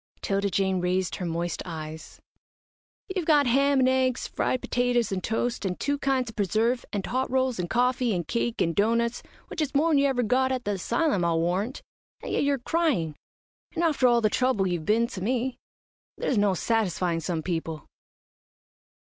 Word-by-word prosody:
'Tilda 200 0 0
Jane 190 -1 +1
raised 180 0 0
her 180 - -3
moist 170 0 -2
eyes. 160 -2 -8 1.0
"You've 355 -4 -2
got 295 -3 +5
ham 275 +3 +3
and 255 - +4
eggs; 260 -1 +1
fried 255 - -1
petetters 245 -2 +1
and 185 -1 -2
toast, 235 +2 -1
and 185 -2 -2
two 285 0 -1
kinds 260 -4 0
of - - -27
preserve, 220 +5 +1
and 200 -2 -2
hot 260 +2 -1
rolls 260 -4 0
and 175 -1 -2
coffee, 250 -2 +1
and 175 -2 -3
cake 235 0 -1
and 165 -1 +1
doughnuts, 235 +3 +1 0.3
which 330 - -4
is 290 -2 -2
more'n 305 0 +4
you 280 - +4
ever 255 -2 +1
got 260 +3 +2
at 255 -1 -2
the 205 - 0
asylum, 220 - 0
I'll 165 -1 +2
warrant, 185 +9 -1 0.4
and - - -5
yet - - +1
you're 280 -1 +2
crying, 250 - 0 0.6
and 335 - 0
after 295 -6 +3
all 240 -1 +4
the 215 - +3
trouble 250 -6 +1
you've 175 -3 -2
been 225 +2 +3
to 195 -5 -7
me. 250 +4 -1 0.6
There's 265 - 0
no 205 -2 +3
satisfying 185 -5 0
some 165 0 -3
people." 165 -2 -3
230 Hz, 180 wpm, -26 LUFS, 185-260 Hz, 1.0 s, got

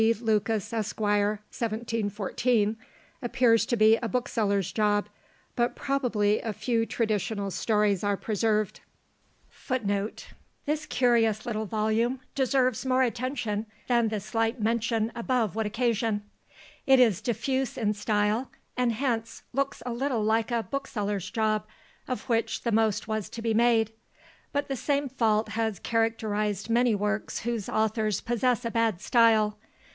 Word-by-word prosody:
Lucas, 220 -2 0
Esq., 220 -2 -3
1714," 215 +1 0 0.5
appears 240 -2 +3
to 240 - 0
be 220 +1 +6
a 230 - -3
bookseller's 205 -6 0
job; 210 -1 +1 0.5
but 240 -1 +1
probably 240 -7 +1
a 225 - -3
few 230 +1 0
traditional 215 -2 -1
stories 210 -2 +1
are 205 -1 +1
preserved. 215 -1 0 0.7
FOOTNOTES: - - -23
[Footnote 210 -5 -1
58: - - -16 0.3
This 300 +1 -1
curious 230 -4 +2
little 220 -2 -2
volume 220 +5 0
deserves 260 -2 +1
more 260 0 +3
attention 235 -3 -2 0.2
than 235 -2 +2
the 215 -1 -2
slight 225 +4 -1
mention 225 0 0
above 235 -3 0
would 220 -1 0
occasion. 225 -2 0 0.6
It 265 -1 +6
is 225 -6 +4
diffuse 255 +3 -1
in 215 -3 +1
style, 210 +3 0 0.3
and 245 -2 +1
hence 230 -2 -2
looks 275 +1 -1
a 245 - -2
little 245 -2 -1
like 220 +2 +1
a 235 -2 0
"bookseller's 210 -9 -3
job," 215 -2 0 0.4
of 255 - -3
which 230 -2 0
the 235 - 0
most 215 -1 +1
was 215 -2 -2
to 230 - -7
be 225 -1 +1
made; 225 -1 +3 0.6
but 285 0 -1
the 270 - -2
same 280 +3 0
fault 225 -4 +1
has 220 -3 -1
characterised 215 -2 -1
many 240 -1 +3
works 210 +1 -2
whose 230 -3 -3
authors 215 -2 +1
possess 240 +1 0
a 230 - -1
bad 225 -5 +1
style. 215 -2 +3
225 Hz, 140 wpm, -27 LUFS, 210-240 Hz, 0.7 s, be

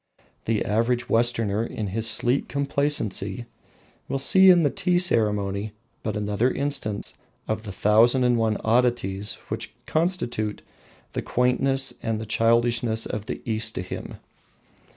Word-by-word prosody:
The 110 -2 0
average 115 +3 0
Westerner, 115 -2 +1
in 110 -3 -4
his 115 +3 -1
sleek 120 +4 +1
complacency, 140 -7 -1 0.6
will 135 - -1
see 190 +8 +6
in 175 -2 +6
the 145 - +2
tea 180 -1 +1
ceremony 105 - +1 0.3
but 110 -1 -3
another 105 +4 0
instance 130 -7 -2 0.3
of 110 0 -2
the 105 -2 -7
thousand 115 +6 +4
and 125 -1 +3
one 110 -2 +1
oddities 110 -4 +1
which - - -5
constitute 155 - -1 0.5
the - - -2
quaintness 135 +2 +1
and 110 -1 -3
childishness 115 0 +2
of 105 +1 -5
the - - -5
East 110 -1 -1
to 90 - -3
him. 90 - -7
115 Hz, 130 wpm, -24 LUFS, 105-125 Hz, 0.6 s, see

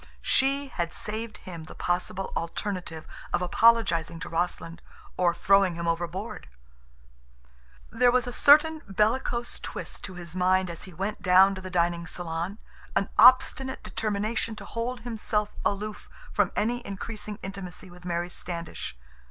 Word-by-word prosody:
She 275 +1 +2
had 170 -8 -3
saved 220 +1 -3
him 170 -3 -9
the - - -11
possible 190 +2 -2
alternative 170 -1 -4 0.3
of - - +1
apologizing 180 -5 +3
to - - -5
Rossland 170 0 -2 0.3
or 180 -1 +3
throwing 195 0 +3
him 170 0 -3
overboard! 175 - -3 1.4
There 245 +2 +4
was 250 0 +3
a 245 - -5
certain 310 +4 +6
bellicose 235 +4 0
twist - - -7
to 185 - -8
his 175 -1 -7
mind 185 0 +2
as 165 - -7
he 190 - -11
went 200 +5 -3
down 190 +1 +6
to 190 - -6
the 185 - -7
dining 170 -1 0
salon, 170 +3 -4 0.4
an 200 - +1
obstinate 255 +2 +6
determination 215 +1 -1
to - - -9
hold 240 +2 -3
himself 220 -3 -1
aloof 210 +1 -2 0.2
from - - +2
any 240 +3 0
increasing 210 +1 -6
intimacy 190 -1 -7
with 180 0 -14
Mary 175 0 -2
Standish. 170 - -6
195 Hz, 145 wpm, -27 LUFS, 175-225 Hz, 1.4 s, certain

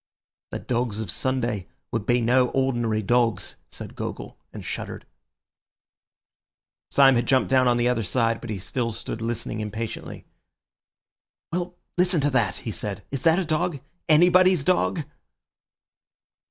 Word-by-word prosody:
"The - - -4
dogs 120 -3 -2
of 105 -6 -3
Sunday 120 -7 -1 0.2
would 115 -2 -3
be 120 0 +3
no 125 +2 +4
ordinary 120 -5 0
dogs," 120 +1 +1
said - - -9
Gogol, - - -6 0.2
and - - -9
shuddered. - - -5 1.8
Syme 135 -1 +6
had 120 -1 +1
jumped 130 -1 +2
down 130 -1 +4
on 120 -1 +3
the 120 0 +2
other 125 -2 +1
side, 115 +3 0
but 120 - -8
he 105 - -2
still 115 +5 -2
stood 110 - -6
listening 115 -1 -3
impatiently. 110 +1 -5 1.3
"Well, 175 0 -2 0.2
listen 180 -2 +3
to 145 +1 +2
that," 110 -9 +1
he 115 - -5
said, 100 -1 -5
"is 135 -2 -3
that 165 0 +4
a 190 - 0
dog—anybody's 175 +2 +3
dog?" 175 -1 +1
125 Hz, 140 wpm, -25 LUFS, 115-145 Hz, 1.8 s, Syme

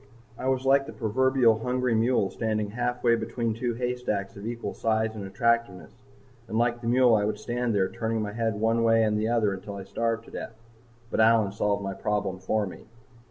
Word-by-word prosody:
I 130 - -4
was 130 0 0
like 135 +1 +4
the - - -8
proverbial 120 0 +2
hungry 125 +1 0
mule 110 -3 +2
standing 110 -2 -2
halfway 120 0 +1
between 115 0 -2
two 120 +1 -2
haystacks 125 -5 -2
of 100 +2 -7
equal 120 0 -4
size 110 0 0
and 105 -2 -6
attractiveness. 100 -4 0 0.6
And 110 - -3
like 120 0 +1
the 115 - -5
mule 125 0 +5
I 105 -2 +3
would 105 0 -1
stand 120 -1 -2
there 95 -2 +2
turning 115 +1 -2
my 105 -1 -5
head 115 -1 -1
one 115 +1 +2
way 115 0 +4
and 105 -1 +1
the 105 +1 0
other 115 -4 +2
until 100 +1 -7
I 100 - -6
starved 115 +3 -2
to - - -14
death. 110 - -7 0.6
But - - -1
Allyn 110 -2 +4
solved 100 0 -1
my 95 0 -3
problem 100 -2 -2
for 105 +3 0
me. 95 - -10
115 Hz, 205 wpm, -27 LUFS, 105-120 Hz, 0.6 s, mule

